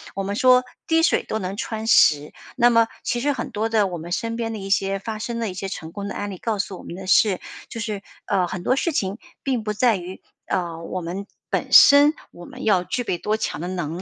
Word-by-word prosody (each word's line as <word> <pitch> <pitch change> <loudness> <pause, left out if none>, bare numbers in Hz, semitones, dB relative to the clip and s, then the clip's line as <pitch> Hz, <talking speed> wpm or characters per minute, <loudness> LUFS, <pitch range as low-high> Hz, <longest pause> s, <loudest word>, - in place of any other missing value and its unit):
我 195 - -2
们 200 +1 -3
说 255 +2 +5 0.2
滴 325 0 +3
水 - - +3
都 220 - -3
能 190 0 -4
穿 220 0 -4
石， 150 -8 +4 0.2
那 240 - +5
么 230 -1 +4 0.2
其 240 - -1
实 285 +4 +1
很 - - -4
多 215 +2 -1
的 215 -3 +2
我 175 - -5
们 170 +2 -8
身 230 +5 -2
边 225 -1 -2
的 - - -4
一 195 0 -6
些 195 0 +1
发 215 +2 -6
生 230 +1 -4
了 225 -2 -1
一 - - -6
些 190 +1 -5
成 165 -4 -7
功 200 +2 -6
的 200 - -5
案 205 0 -4
例， 185 - -7
告 225 +1 -2
诉 195 -1 -3
我 - - -12
们 - - -8
的 190 +1 -8
是， 190 0 +4 0.3
就 230 - -7
是， 210 -2 -4 0.2
呃， 190 -3 +1
很 175 0 -5
多 255 - +2
事 335 +5 0
情 195 -6 -1 0.3
并 255 -5 -1
不 210 0 -2
在 225 0 +3
于， 180 +1 -8 0.3
呃， 170 -3 -2
我 185 +2 -4
们 180 +4 -5 0.2
本 - - -2
身， 290 +1 +8 0.2
我 175 - -12
们 - - -10
要 195 -5 +3
具 245 +7 -2
备 180 - -2
多 210 +4 -1
强 - - -3
的 175 - -3
能 175 -2 -4
200 Hz, 275 characters per minute, -23 LUFS, 185-230 Hz, 0.3 s, 身